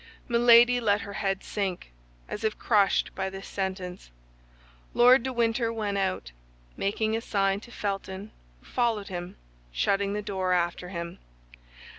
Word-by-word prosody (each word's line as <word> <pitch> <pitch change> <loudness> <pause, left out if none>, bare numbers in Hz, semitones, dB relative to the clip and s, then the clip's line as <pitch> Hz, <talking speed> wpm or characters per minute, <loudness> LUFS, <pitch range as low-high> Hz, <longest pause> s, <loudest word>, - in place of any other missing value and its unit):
Milady 240 0 +6
let 205 -3 +2
her 200 - -7
head 195 -1 -1
sink, 190 - -3 0.4
as 210 - -6
if 220 -1 0
crushed 205 -4 +2
by 190 - -2
this 195 0 -8
sentence. 190 -2 -4 0.9
Lord 250 +2 +7
de 260 - -3
Winter 230 -1 +1
went 210 -3 -2
out, 185 - -2 0.4
making 215 +2 0
a 225 - -2
sign 195 -2 +1
to 235 - -14
Felton, 195 -1 -4 0.3
who - - -24
followed 230 -5 0
him, 175 -1 -6 0.4
shutting 195 - +1
the 210 0 -3
door 190 -2 -1
after 175 0 -1
him. 170 -2 -6
200 Hz, 145 wpm, -27 LUFS, 190-225 Hz, 0.9 s, Lord